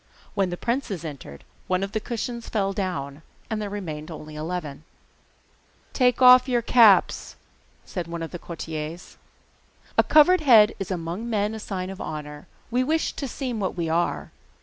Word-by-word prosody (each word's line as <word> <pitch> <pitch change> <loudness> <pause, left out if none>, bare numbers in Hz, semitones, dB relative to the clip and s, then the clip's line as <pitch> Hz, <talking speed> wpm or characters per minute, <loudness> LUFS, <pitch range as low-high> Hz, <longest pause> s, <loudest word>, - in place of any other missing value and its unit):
When 195 -2 +1
the 175 - -4
princes 235 - -2
entered 135 - -9 0.2
one 185 +1 0
of 195 - -4
the 220 - -1
cushions 235 +1 -5
fell 195 -3 0
down, 155 -7 -4 0.3
and 215 -1 -1
there 205 - -3
remained 165 -6 -6
only 155 -1 -9
eleven. 155 -2 -5 1.1
'Take 250 -1 +2
off 250 +1 +8
your 240 -2 +1
caps,' 220 -6 +4 0.5
said 175 -3 -5
one 170 0 -5
of 165 - -6
the 175 - -6
courtiers. 160 0 -7 0.8
'A - - +7
covered 315 +4 +6
head 230 -7 +6
is 195 - -4
among 180 +5 -4
men 210 -1 0
a 220 - -6
sign 190 -3 -4
of 195 - -9
honour. 150 -1 -7 0.2
We 250 +2 +2
wish 315 +4 0
to 275 - -4
seem 250 -2 -4
what 190 -2 -2
we 165 -2 -1
are. 170 +2 -1
195 Hz, 170 wpm, -24 LUFS, 165-235 Hz, 1.1 s, off